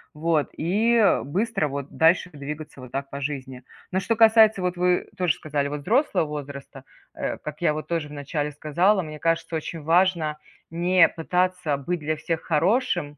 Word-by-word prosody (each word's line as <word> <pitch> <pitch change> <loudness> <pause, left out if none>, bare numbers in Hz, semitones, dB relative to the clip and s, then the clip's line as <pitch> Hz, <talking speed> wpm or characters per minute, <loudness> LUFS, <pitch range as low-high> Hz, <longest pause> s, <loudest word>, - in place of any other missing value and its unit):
Вот 155 -1 0
и 220 +7 +2 0.2
быстро 190 - -1
вот 140 0 -6
дальше 170 +3 +3
двигаться 145 -1 -8
вот 125 - -11
так 135 0 -4
по 140 0 -6
жизни. 130 -3 -5 0.3
Но, 190 - +1
что 225 +5 0
касается, 220 -3 +5
вот 180 0 -1
вы 180 0 +1
тоже 180 -4 +1
сказали, 145 -2 -2
вот 145 0 -5
взрослого 210 - +2
возраста. 140 -2 -8 0.3
Э, - - -3
как 150 +2 -8
я 155 -3 +2
вот 155 - -6
тоже 165 -3 -2
в - - -10
начале 145 +1 -3
сказала, 175 +7 +1
мне 155 -1 -8
кажется, 165 +1 0
очень 160 0 -5
важно 165 -2 +2 0.3
не 175 +2 +4
пытаться 180 -2 -1
быть 170 +5 -3
для 155 +1 -2
всех 160 +1 -3
хорошим. 170 - 0
160 Hz, 175 wpm, -24 LUFS, 145-180 Hz, 0.3 s, касается